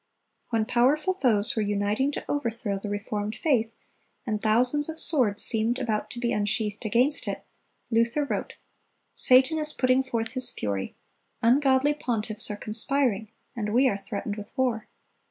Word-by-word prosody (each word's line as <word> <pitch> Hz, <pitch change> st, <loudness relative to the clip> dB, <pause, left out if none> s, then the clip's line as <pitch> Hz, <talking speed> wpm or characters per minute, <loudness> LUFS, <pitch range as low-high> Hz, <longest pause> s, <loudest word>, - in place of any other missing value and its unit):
(308) 230 Hz, -, -1 dB
When 220 Hz, +3 st, -3 dB
powerful 290 Hz, +9 st, +2 dB
foes 235 Hz, -, +1 dB
were 220 Hz, -, -1 dB
uniting 205 Hz, +6 st, -1 dB
to -, -, -6 dB
overthrow 230 Hz, -7 st, -3 dB
the 205 Hz, -, -7 dB
reformed 205 Hz, +1 st, -4 dB
faith, 230 Hz, -7 st, -1 dB, 0.5 s
and 215 Hz, -2 st, -3 dB
thousands 250 Hz, +7 st, +1 dB
of 320 Hz, 0 st, -5 dB
swords 245 Hz, -10 st, +7 dB
seemed 225 Hz, +2 st, +1 dB
about 225 Hz, -5 st, -3 dB
to 240 Hz, -, -8 dB
be 240 Hz, -1 st, -1 dB
unsheathed 210 Hz, 0 st, -2 dB
against 245 Hz, +7 st, 0 dB
it, -, -, -5 dB, 0.5 s
Luther 230 Hz, +6 st, +1 dB
wrote: -, -, -5 dB, 0.6 s
"Satan 260 Hz, +5 st, +5 dB
is 305 Hz, 0 st, +1 dB
putting 255 Hz, -1 st, +1 dB
forth 230 Hz, -4 st, -4 dB
his 255 Hz, -1 st, +5 dB
fury; 100 Hz, -2 st, -5 dB, 0.5 s
ungodly 265 Hz, +3 st, +3 dB
pontiffs 220 Hz, -6 st, -2 dB
are 210 Hz, -, -5 dB
conspiring; 220 Hz, 0 st, 0 dB, 0.3 s
and 210 Hz, -3 st, -4 dB
we 260 Hz, +2 st, +4 dB
are 240 Hz, -, 0 dB
threatened 200 Hz, +1 st, -6 dB
with 210 Hz, +5 st, -11 dB
war. 245 Hz, -4 st, -1 dB
230 Hz, 155 wpm, -25 LUFS, 210-260 Hz, 0.6 s, swords